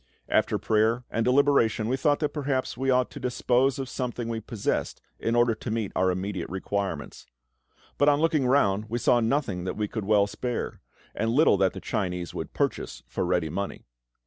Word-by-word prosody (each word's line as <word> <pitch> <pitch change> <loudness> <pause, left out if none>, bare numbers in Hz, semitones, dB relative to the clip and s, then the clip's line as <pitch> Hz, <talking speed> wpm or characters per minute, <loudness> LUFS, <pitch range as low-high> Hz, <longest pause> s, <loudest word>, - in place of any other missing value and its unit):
After - - +2
prayer 110 +3 +1
and 115 - 0
deliberation 125 -4 +3
we 125 - +1
thought 145 +2 +2
that 150 - 0
perhaps 140 -3 -1
we 135 +2 -1
ought 125 -1 +2
to - - -8
dispose 125 +1 +1
of 135 -1 -4
something 120 -2 -4
we 115 -1 -2
possessed 110 -1 -2 0.2
in 115 - 0
order 120 -1 +4
to 110 +2 -7
meet 110 -3 -2
our 95 0 +3
immediate 95 0 -3
requirements. 95 -4 -4 0.7
But 145 - +5
on 145 0 +3
looking 155 -5 +2
round 105 -6 +3
we 120 - -1
saw 120 0 +3
nothing 115 -6 0
that 95 - -3
we 105 -1 -1
could 110 -1 -4
well 105 -1 +4
spare, 120 +4 -4 0.3
and 110 +2 -1
little 135 0 +5
that 95 -1 +2
the 95 - -7
Chinese 90 -3 -3
would - - -5
purchase - - -2
for - - -2
ready 90 -3 0
money. 100 +4 -4
115 Hz, 190 wpm, -27 LUFS, 100-130 Hz, 0.7 s, But